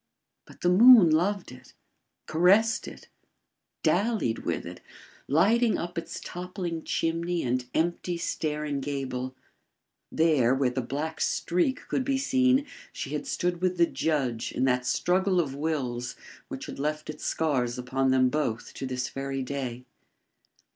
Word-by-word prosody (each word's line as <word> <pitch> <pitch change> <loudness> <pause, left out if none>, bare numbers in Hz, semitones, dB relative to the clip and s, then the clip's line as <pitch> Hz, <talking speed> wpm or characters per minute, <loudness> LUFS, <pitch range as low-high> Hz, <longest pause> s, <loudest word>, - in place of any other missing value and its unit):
But - - -16
the 175 - +3
moon 210 -2 +8
loved 180 +1 +1
it; 125 - -15 0.5
caressed 195 +8 +3
it; - - -11 0.8
dallied 210 - +1
with - - -3
it, - - -9 0.5
lighting 220 - +3
up 175 +1 -5
its 165 0 -5
toppling 180 -2 -5
chimney 170 +1 -1
and 125 0 0
empty, 175 +1 0
staring 150 -3 -2
gable. 130 -2 -4 0.8
There, 145 -6 +3
where 135 -2 +1
the 130 +1 -2
black 145 +6 -4
streak 180 +10 0
could 265 - 0
be 275 0 0
seen, 265 0 +2 0.3
she 135 - -6
had 150 - -3
stood 175 0 -1
with 185 0 0
the 170 - +5
judge 135 -10 -1
in - - -1
that 125 -1 +1
struggle 185 +5 +2
of 145 -6 -1
wills 135 -5 -3 0.3
which - - -6
had - - -8
left 150 +1 -2
its 155 0 -7
scars 130 -6 0
upon 130 +2 0
them 130 -1 +4
both 125 -6 -2
to 135 - -5
this 125 -1 -2
very 135 0 -4
day. 125 -2 -5
155 Hz, 145 wpm, -27 LUFS, 130-180 Hz, 0.8 s, moon